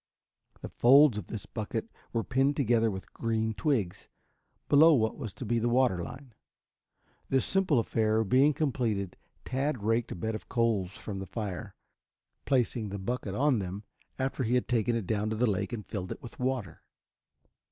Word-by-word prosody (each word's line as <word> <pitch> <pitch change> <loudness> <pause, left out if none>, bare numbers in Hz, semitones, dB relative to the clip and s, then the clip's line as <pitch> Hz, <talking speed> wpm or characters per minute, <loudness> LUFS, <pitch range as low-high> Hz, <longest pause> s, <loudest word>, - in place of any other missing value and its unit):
The - - -6
folds 135 -2 +6
of - - -9
this 110 -4 -6
bucket 110 - -4 0.2
were 115 -1 -1
pinned 135 +3 +1
together 115 -4 +2
with 95 -2 -7
green 110 -1 -1
twigs, 105 - -1 0.6
below 155 +2 +7
what 110 -3 +1
was 110 - -6
to 130 - -6
be 115 +2 +1
the 120 +1 +1
water 120 -8 +2
line. 130 +4 -10 1.0
This 135 -1 +2
simple 190 -7 +2
affair 110 -1 +1
being 130 +8 +4
completed 120 - -1 0.3
Tad 130 -3 -2
raked 115 +2 +1
a - - -3
bed 110 +5 -3
of 110 - -7
coals 115 -6 +1
from 100 -2 -6
the 95 - -6
fire, 100 -8 -5 0.7
placing 120 -4 +1
the 100 - -4
bucket 100 0 -3
on 140 -2 +2
them 95 +2 -5 0.3
after 135 0 -2
he 120 0 +1
had 125 - +1
taken 120 -1 +1
it 115 -4 -2
down 105 +2 -1
to 110 - -2
the 120 +3 +2
lake 100 0 -1
and 115 -4 -5
filled 95 -4 -5
it - - -7
with 120 - -11
water. 125 - -2
115 Hz, 175 wpm, -29 LUFS, 105-130 Hz, 1.0 s, below